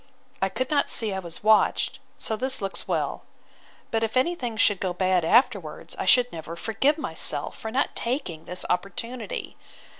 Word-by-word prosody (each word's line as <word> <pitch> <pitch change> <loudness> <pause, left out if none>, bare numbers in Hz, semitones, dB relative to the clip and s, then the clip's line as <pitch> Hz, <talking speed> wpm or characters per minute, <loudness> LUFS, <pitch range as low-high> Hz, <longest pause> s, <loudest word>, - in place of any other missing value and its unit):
I - - +2
could 255 +2 -3
not 290 -1 +2
see 220 -3 +5
I 190 - -2
was 170 -1 -7
watched; 220 +4 +3 0.2
so 220 - -1
this 260 +4 +1
looks 195 -1 -4
well. - - -1 0.7
But 225 - +1
if 225 +2 -1
any 300 +7 +3
thing 245 -9 -5
should 205 -3 +3
go 185 -2 -1
bad 185 -1 +1
afterwards, 235 +10 +1
I - - -4
should 245 -1 +5
never 165 0 -7
forgive 225 - +1
myself, 310 - -1
for 220 - -6
not 260 +5 0
taking 230 - -3
this 180 +1 -4
opportunity. 205 +6 -3
220 Hz, 175 wpm, -25 LUFS, 185-255 Hz, 0.7 s, see